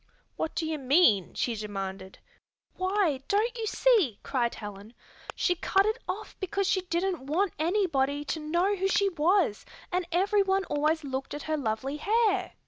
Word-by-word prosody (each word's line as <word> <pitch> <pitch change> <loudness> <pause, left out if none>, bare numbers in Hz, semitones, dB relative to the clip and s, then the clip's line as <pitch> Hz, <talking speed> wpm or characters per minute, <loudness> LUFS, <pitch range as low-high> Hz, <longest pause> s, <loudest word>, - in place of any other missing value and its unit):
"What 320 - -3
do 325 - -1
you 315 -1 -2
mean?" 255 - +3
she 240 - 0
demanded. 195 -3 -6 0.6
"Why, 370 -7 0
don't 445 +4 +1
you 450 -2 -3
see?" 410 - +3
cried 240 -3 -1
Helen. 205 +2 -9 0.4
"She 360 - +2
cut 385 +3 +2
it 435 +3 0
off 430 +3 -5
because 390 +1 -1
she 375 0 +2
didn't 355 -4 -2
want 355 +5 +1
anybody 300 -6 +1
to 320 - -2
know 345 +6 +1
who 385 0 0
she 395 +1 +2
was, 340 - +1 0.3
and 360 -1 -1
everyone 390 +2 +2
always 305 +2 0
looked 270 0 -4
at 295 - -6
her 315 - -1
lovely 265 +1 -2
hair. 405 +1 +1
335 Hz, 160 wpm, -28 LUFS, 270-390 Hz, 0.6 s, mean